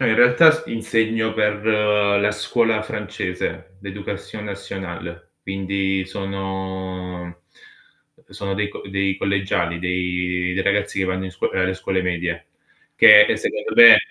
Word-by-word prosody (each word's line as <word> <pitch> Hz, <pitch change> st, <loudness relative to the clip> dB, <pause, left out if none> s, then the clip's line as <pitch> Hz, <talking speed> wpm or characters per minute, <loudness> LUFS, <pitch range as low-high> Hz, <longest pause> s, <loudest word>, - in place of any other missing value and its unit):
No, 130 Hz, -, +1 dB
in 110 Hz, -, +2 dB
realtà 125 Hz, +7 st, +7 dB
s 160 Hz, 0 st, -2 dB
insegno 115 Hz, -1 st, -1 dB
per 105 Hz, -1 st, -1 dB
la 105 Hz, -1 st, +2 dB
scuola 110 Hz, +1 st, 0 dB
francese, 95 Hz, -2 st, -5 dB
l'Éducation 100 Hz, +1 st, -7 dB
nationale, 95 Hz, -4 st, -8 dB
quindi 95 Hz, 0 st, -2 dB
sono 95 Hz, -2 st, -6 dB, 0.8 s
e -, -, -21 dB
sono 100 Hz, -1 st, -4 dB
dei 105 Hz, +1 st, -2 dB
co -, -, -10 dB
dei 100 Hz, 0 st, -1 dB
collegiali, 95 Hz, -4 st, -1 dB
dei 90 Hz, 0 st, -2 dB
dei 95 Hz, -, -1 dB
ragazzi 100 Hz, 0 st, 0 dB
che 95 Hz, -, +1 dB
vanno 95 Hz, 0 st, -3 dB
in -, -, -7 dB
scuo 90 Hz, -, -3 dB
ehm, -, -, -1 dB
alle 95 Hz, 0 st, 0 dB
scuole 95 Hz, 0 st, -2 dB
medie, 85 Hz, -1 st, -3 dB, 0.5 s
che -, -, +9 dB
che -, -, +1 dB
secondo -, -, -4 dB
me 450 Hz, 0 st, +11 dB
95 Hz, 145 wpm, -21 LUFS, 90-105 Hz, 0.8 s, me